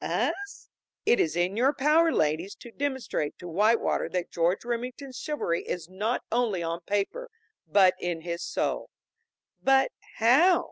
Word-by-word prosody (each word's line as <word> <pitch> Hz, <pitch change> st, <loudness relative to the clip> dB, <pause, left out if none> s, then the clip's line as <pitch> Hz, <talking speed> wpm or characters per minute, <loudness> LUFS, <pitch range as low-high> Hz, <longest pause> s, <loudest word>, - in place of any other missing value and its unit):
"Us?" 405 Hz, 0 st, -2 dB, 0.4 s
"It 240 Hz, -, +4 dB
is 160 Hz, -1 st, +1 dB
in 175 Hz, +3 st, 0 dB
your 260 Hz, +5 st, +3 dB
power, 315 Hz, +4 st, +4 dB
ladies, 160 Hz, -, 0 dB
to 235 Hz, -, -12 dB
demonstrate 265 Hz, -, -3 dB
to 175 Hz, -, -9 dB
Whitewater 210 Hz, +7 st, +2 dB
that 180 Hz, -1 st, -3 dB
George 175 Hz, +6 st, 0 dB
Remington's 250 Hz, +2 st, -4 dB
chivalry 295 Hz, -, -1 dB
is 170 Hz, -2 st, -5 dB
not 215 Hz, +6 st, -1 dB
only 220 Hz, -7 st, +1 dB
on 165 Hz, +1 st, -3 dB
paper, 205 Hz, -, -2 dB, 0.4 s
but 190 Hz, -3 st, +5 dB
in 175 Hz, -2 st, -3 dB
his 170 Hz, +1 st, -4 dB
soul." -, -, -2 dB, 0.7 s
"But 270 Hz, 0 st, +4 dB, 0.2 s
how?" 275 Hz, +11 st, +5 dB
220 Hz, 145 wpm, -27 LUFS, 175-265 Hz, 0.7 s, but